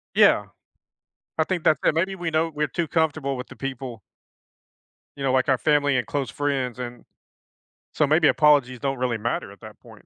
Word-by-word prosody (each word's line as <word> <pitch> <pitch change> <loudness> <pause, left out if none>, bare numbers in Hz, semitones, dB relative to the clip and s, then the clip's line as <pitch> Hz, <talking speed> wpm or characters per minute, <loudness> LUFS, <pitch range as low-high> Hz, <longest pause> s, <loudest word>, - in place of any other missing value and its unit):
Yeah. - - +5 0.9
I 160 - +3
think 175 0 -3
that's 155 -4 +4
it, - - +3
maybe 185 +5 0
we 175 -3 -3
know 160 +1 +2
we're 150 0 -1
too 170 +4 -2
comfortable 155 -4 0
with 125 -1 -6
the - - -13
people 130 -4 -6 1.2
you 140 - -7
know, 135 -1 +1
like 130 +1 +2
our 135 -2 +3
family 145 -2 +2
and 125 -3 -1
close 140 -4 -3
friends, 135 -4 -2
and 120 -1 -7 0.9
so 150 - +2
maybe 155 +2 +4
apologies 140 -5 +3
don't 135 0 -2
really 125 -2 -1
matter 110 -2 -3
at 100 - -17
that - - -12
point. - - -17
140 Hz, 190 wpm, -24 LUFS, 125-155 Hz, 1.2 s, Yeah